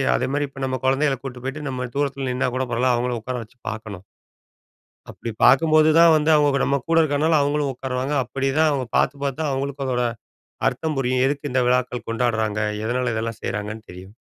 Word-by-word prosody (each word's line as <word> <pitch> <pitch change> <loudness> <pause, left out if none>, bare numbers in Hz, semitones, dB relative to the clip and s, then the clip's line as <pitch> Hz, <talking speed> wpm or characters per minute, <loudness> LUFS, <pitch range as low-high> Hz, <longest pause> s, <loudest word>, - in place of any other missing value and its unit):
அதேமாரி 145 - -1
இப்ப 135 0 -10
நம்ம 130 0 -2
குழந்தைகள 135 +1 +2
கூட்டு 125 -2 -7
போய்ட்டு, 145 +2 -4
நம்ம 125 -1 -3
தூரத்துல 140 -2 -1
நின்னா 125 0 0
கூட 130 0 0
பரவால்ல, 125 +2 +2
அவங்கள 120 -1 -1
உக்கார 125 +2 -4
வச்சு 125 +3 -28
பார்க்கணும். 110 -4 -7 1.1
அப்படி 115 - -6
பார்க்கும்போது 155 +2 +5
தான் 170 -1 +7
வந்து, 155 0 +1
அவங்களுக்கு 145 -2 +3
நம்ம 140 - +1
கூட 165 - +3
இருக்கனால 155 +1 +2
அவங்களும் 145 -1 0
உட்காருவாங்க. 130 +2 -3
அப்படி 135 +1 -3
தான் 160 -1 +5
அவங்க 135 -3 -1
பாத்து 135 - +2
பாத்து 140 +1 -2
தான் 150 -3 0
அவங்களுக்கும் 140 +1 -3
அதோட 125 -1 0 0.7
அர்த்தம் 155 -3 -3
புரியும். 130 0 +1
எதுக்கு 145 +1 -2
இந்த 130 -1 +2
விழாக்கள் 125 -1 0
கொண்டாடுறாங்க? 110 -3 0 0.2
எதனால 125 +1 0
இதெல்லாம் 115 0 -3
செய்றாங்கன்னு 105 +2 -4
தெரியும். 95 +3 -12
130 Hz, 180 wpm, -22 LUFS, 125-145 Hz, 1.1 s, தான்